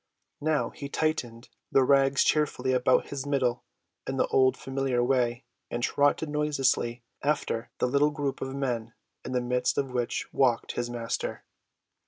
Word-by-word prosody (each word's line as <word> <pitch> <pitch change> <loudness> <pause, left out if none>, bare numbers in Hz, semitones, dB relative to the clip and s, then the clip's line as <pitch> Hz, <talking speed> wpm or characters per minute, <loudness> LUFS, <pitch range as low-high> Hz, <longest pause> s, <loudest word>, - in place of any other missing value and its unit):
Now 155 0 +1
he 140 - -7
tightened 125 -7 -2 0.2
the 135 - +5
rags 135 0 +4
cheerfully 150 -3 +1
about 125 0 +3
his 140 0 -5
middle 125 -4 0 0.4
in 135 - -2
the - - +3
old 130 -1 +4
familiar 135 -2 -1
way 125 -1 +1 0.3
and 120 0 -3
trotted 145 +4 +2
noiselessly 135 -5 0 0.2
after 140 -5 -1
the - - +1
little 140 +4 +3
group 145 -2 -3
of 135 0 -4
men, 120 -4 -2 0.3
in 130 - -5
the 125 - +1
midst 125 0 0
of 135 -2 0
which 120 -1 -1
walked 125 -4 +2
his 120 0 -3
Master. 120 -1 -3
130 Hz, 155 wpm, -28 LUFS, 120-140 Hz, 0.4 s, the